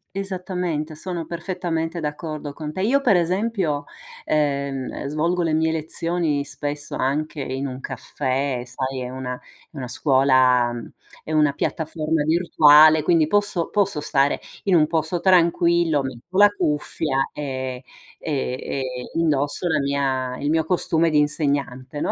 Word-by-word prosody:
Esattamente, 180 -5 -3
sono 170 +1 -5
perfettamente 170 -1 -3
d'accordo 150 0 -5
con 150 +1 -7
te. 185 - -3
Io 245 +8 +3
per 245 -8 +3
esempio, 180 -4 0 0.4
ehm, 140 -3 -1
svolgo 165 +5 0
le 165 -2 0
mie 160 +1 +2
lezioni 160 -1 -1
spesso 145 +1 -5
anche 150 +4 -1
in 130 +1 -3
un 130 -1 -5
caffè, 135 -1 -2
sai 130 +2 -4
è 125 - -5
una 125 -1 -5 0.3
è 155 - -13
una 130 - -4
scuola 130 -2 +3 0.5
è - - -7
una 150 -2 +3
piattaforma 155 0 -1
virtuale, 155 -2 +6
quindi 160 -1 +3
posso 205 -3 +1
posso 200 -7 0
stare 140 -1 +1 0.2
in 195 -3 +3
un 155 -2 +5
posto 160 +2 -1
tranquillo, 170 -3 +3
metto 135 +7 -8
la 205 +1 +8
cuffia 150 -6 -1
e, 130 -3 -4 0.4
ehm, 140 -5 -2
ehm, 135 - -4 0.3
indosso 150 -1 0
la 155 -2 +2
mia 135 -2 -1
il 145 - -1
mio 160 +1 +2
costume 170 -2 +1
di 150 -2 +3
insegnante, 145 -2 -1
no? - - 0
155 Hz, 140 wpm, -22 LUFS, 140-170 Hz, 0.5 s, la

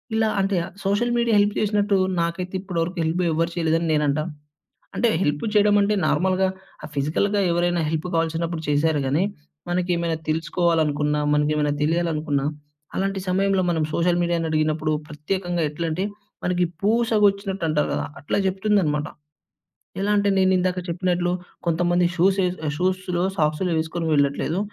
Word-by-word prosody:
ఇలా 220 0 +2
అంటే, 195 0 0 0.3
social 205 +5 +1
media 235 -1 +2
help 205 0 +3
చేసినట్టు 205 -1 +1 0.3
నాకైతే 180 +2 -3
ఇప్పటి 185 -3 -4
వరకు 180 +2 -6
హెల్ప్ 160 +3 -1
ఎవ్వరు 165 +2 +1
చేయలేదని 165 0 +1
నేనంటాను. 150 +2 0 0.6
అంటే 240 - +2
హెల్పు 145 +2 0
చేయడం 205 0 +5
అంటే, 205 +1 +2
నార్మల్‌గా 190 +1 +2 0.4
ఆ - - -4
ఫిజికల్‌గా 165 +9 +1
ఎవరైనా 175 0 +1
హెల్పు 160 +2 -2
కావాల్సినప్పుడు 165 0 -1
చేసారు 150 +1 +2
గాని, 150 +8 +2 0.4
మనకి 180 0 -1
ఏమైనా 170 -1 -1
తెలుసుకోవాలనుకున్న, 155 -2 +1 0.2
మనకి 150 0 +2
ఏమైనా 150 -1 +1
తెలియాలనుకున్న 155 -3 0 0.5
అలాంటి 195 0 -1
సమయంలో 195 +1 +2
మనం 160 -2 0
సోషల్ 175 +1 +2
మీడియా‌ని 170 -1 0
అడిగినప్పుడు 155 0 0 0.2
ప్రత్యేకంగా 175 +3 -2
ఎట్లంటే, 165 +4 -2 0.4
మనకి 180 0 +1 0.2
పూసగుచ్చినట్టుంటారు 200 -7 +1
గదా! 70 0 -2
అట్లా 145 - -1
చెప్తుందన్నమాట. 190 -7 +1 0.9
ఎలా 205 +1 +1
అంటే, 200 0 +2
నేను 190 0 +4
ఇందాక 180 0 0
చెప్పినట్లు 175 0 0 0.4
కొంతమంది 175 +1 +2
షూస్ 190 +3 +3
ఏస్ 180 +1 -2 0.2
షూస్‌లో 185 0 0
సాక్సులు 155 +4 +1
వేసుకొని 165 +1 -3
వెళ్ళట్లేదు. 145 +5 +1
175 Hz, 135 wpm, -23 LUFS, 160-190 Hz, 0.9 s, చేయడం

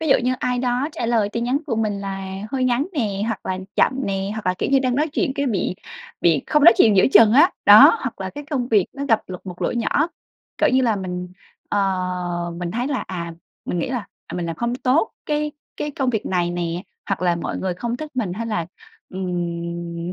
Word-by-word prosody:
Ví 320 - -2
dụ 270 - +6
như 255 0 +2
ai 250 0 -1
đó 250 +3 0
trả 235 - -3
lời 225 -3 +2
tin 235 +3 -3
nhắn 255 +3 +1
của 230 -5 -1
mình 210 -3 -1
là 195 -1 -5 0.2
hơi 260 -1 0
ngắn 250 +3 +1
nè, 205 -9 -1
hoặc 225 -3 -4
là 185 0 -2 0.2
chậm - - +4
nè, 195 0 -2
hoặc 220 -3 -6
là, 185 - +2
kiểu - - -1
như, 275 - +5
đang 255 -2 0
nói 305 +2 +1
chuyện 265 - 0
cái 280 0 -1
bị 190 -5 -1 0.5
bị 160 -5 +3
không 300 -1 +3
nói 340 - +10
chuyện 215 -3 +5
giữa - - +6
chừng 215 +1 +7
á, 310 +8 +6
đó. - - +9
Hoặc - - -5
là - - -3
cái 290 0 -8
công 255 -4 -1
việc 205 -5 +3
nó 280 0 -5
gặp 225 -4 +3
lục 180 -1 -7
một 180 -1 -7
lỗi - - 0
nhỏ, 290 +7 +1 0.5
cỡ - - +4
như 260 0 +4
là, 225 -4 +2
mình, 180 -1 -4 0.4
ờ, 205 - 0 0.8
mình 175 -1 -4
thấy 240 +5 -2
là, 270 - -2
à, 170 -2 -5 0.3
mình 175 - -2
nghĩ 170 - -1
là, 235 -6 -3 0.2
à - - -8
"Mình 175 -1 -2
làm 165 - -4
không 235 +1 -1
tốt 275 - +1 0.2
cái 300 0 -1 0.2
cái 295 - -3
công 265 -2 -1
việc 220 -3 -2
này 175 -2 0
nè", 175 0 -3 0.3
hoặc 195 - -1
là 175 -1 +2
"mọi 170 - -4
người 185 -2 -2
không 235 +6 -3
thích 305 +1 -7
mình", 215 -8 -1
hay 230 +4 -4
là, 170 -7 -2 0.4
ừm, 170 -1 -4
220 Hz, 240 wpm, -22 LUFS, 180-255 Hz, 0.8 s, nói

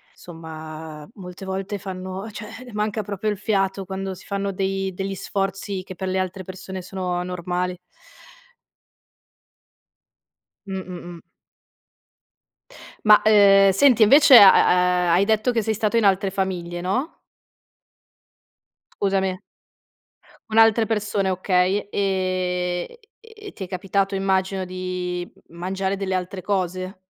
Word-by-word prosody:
somma, 160 -2 -10
molte 185 -2 -10
volte 190 +2 -4
fanno 190 +2 -6
cioè 210 0 -8
le 245 - -12
manca 210 0 -2
proprio 205 +1 -3
il 205 - -4
fiato 195 -2 -1
quando 190 +1 -5
si 185 - -14
fanno 200 0 -2
dei 195 0 -2
degli 195 +1 -4
sforzi 195 0 -3
che 185 - -10
per 190 +1 -5
le 185 0 0
altre 185 0 -4
persone 190 0 -7
sono 180 -1 -3
normali. 180 0 -3 2.9
Mh-mh, 185 -2 -6 0.2
mh. 165 - -14 1.9
Ma, 210 0 +7
ehm, 200 -2 +6
senti, 240 +3 +4
invece 275 +4 +8
ha 195 -2 +10 0.6
ha - - +4
hai 185 +3 +4
detto 220 +3 +1
che 230 -2 0
sei 220 +1 -1
stato 215 +2 0
in 225 - +3
altre 195 0 +2
famiglie, 175 -3 -3
no? 250 - -2 1.7
Scusami. 190 -2 -1 1.1
Con 220 0 0
altre 225 0 +5
persone, 210 -3 -1
okay, 185 +2 +1
ehm, 185 -2 -1 0.4
e 425 -2 -12
ti 195 - -7
è 180 - -10
capitato 195 +2 -1
immagino 190 0 0
di 180 -1 -4 0.2
mangiare 190 +3 -3
delle 195 -1 -3
altre 185 0 -4
cose? 185 -1 -3
190 Hz, 125 wpm, -22 LUFS, 185-200 Hz, 2.9 s, ha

